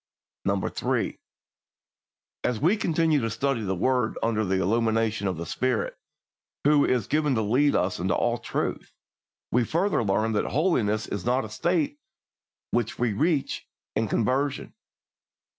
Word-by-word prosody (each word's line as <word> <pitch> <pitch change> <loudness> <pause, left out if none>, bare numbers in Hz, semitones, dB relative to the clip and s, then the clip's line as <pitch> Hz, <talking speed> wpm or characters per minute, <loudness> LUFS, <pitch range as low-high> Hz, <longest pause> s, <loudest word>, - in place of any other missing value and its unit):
3. - - -1 1.2
As 120 -3 0
we 170 +9 +3
continue 165 -6 +2
to 115 - -1
study 130 +2 -1
the 95 -2 -1
word 125 +3 +1
under 110 -1 +1
the 95 -1 0
illumination 110 +1 +1
of 90 -3 -2
the 85 - -4
Spirit, 125 +6 -1 0.7
who 145 0 +5
is 125 -5 +1
given 150 +1 +1
to 110 - +1
lead 130 +8 +3
us 90 0 0
into 90 +1 +1
all - - +1
truth, - - -3 0.6
we 125 +1 +3
further 170 - +1
learn 110 +2 +1
that 105 - 0
holiness 120 - +1
is 100 -3 -4
not 125 +1 +1
a - - -8
state 150 +5 0 0.7
which 120 -2 0
we 120 -3 +1
reach 150 - 0 0.3
in 110 +1 +1
conversion. 130 +7 0
120 Hz, 140 wpm, -26 LUFS, 105-145 Hz, 1.2 s, who